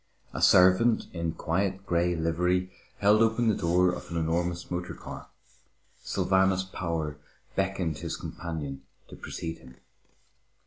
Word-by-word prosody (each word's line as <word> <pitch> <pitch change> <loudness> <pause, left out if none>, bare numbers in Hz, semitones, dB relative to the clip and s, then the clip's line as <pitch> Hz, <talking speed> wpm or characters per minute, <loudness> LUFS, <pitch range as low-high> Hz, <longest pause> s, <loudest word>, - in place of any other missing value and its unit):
A - - -4
servant 95 +6 +5
in 85 -2 -2
quiet 95 +4 -1
grey 85 -1 +1
livery 90 +3 0 0.3
held 105 +2 +5
open 115 +1 +3
the - - +3
door 90 +1 +3
of 90 - -7
an 85 - -3
enormous 85 +2 -1
motor 90 0 -3
car. - - -9 0.7
Sylvanus 95 0 +2
Power 85 -5 -3 0.4
beckoned 95 -5 -1
his 85 +1 -4
companion 75 -5 -6 0.3
to - - -10
precede 80 -1 -6
him. 65 -4 -15
90 Hz, 130 wpm, -28 LUFS, 80-95 Hz, 0.7 s, servant